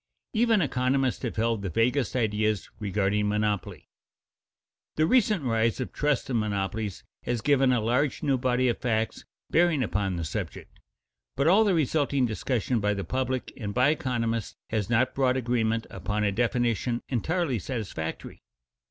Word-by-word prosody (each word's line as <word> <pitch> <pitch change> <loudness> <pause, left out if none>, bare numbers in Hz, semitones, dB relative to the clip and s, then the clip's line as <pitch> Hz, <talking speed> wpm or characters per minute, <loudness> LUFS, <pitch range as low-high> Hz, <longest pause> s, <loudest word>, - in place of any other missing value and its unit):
Even 225 -4 +3
economists 130 -1 0
have 120 - -3
held 115 -1 0
the 100 - -3
vaguest 120 - +1
ideas 110 -3 0
regarding 105 0 0
monopoly. 105 -2 -2 1.1
The 155 - +3
recent 210 - +3
rise 115 -1 +1
of 130 - -4
trusts 150 -3 0
and 125 -4 0
monopolies 105 -1 -2 0.2
has 120 -1 -2
given 135 -1 +3
a 125 - +3
large 125 +7 0
new 140 -3 +2
body 125 0 +1
of 120 - 0
facts 110 -2 -1 0.3
bearing 165 -5 +3
upon 100 -4 -1
the 85 - -3
subject, 80 - -6 0.6
but 140 - +1
all 195 +7 +6
the 200 -4 +2
resulting 145 -3 +1
discussion 120 +1 -1
by 105 0 +1
the 100 - -3
public 130 +1 -2
and 100 -5 -5
by 125 +3 +4
economists 120 -7 -1 0.2
has 110 -3 -1
not 120 +2 +2
brought 130 -1 +2
agreement 115 -2 0
upon 105 0 -2
a 100 - +2
definition 120 +1 0
entirely 140 +1 0
satisfactory. 100 -8 -5
120 Hz, 150 wpm, -27 LUFS, 110-135 Hz, 1.1 s, all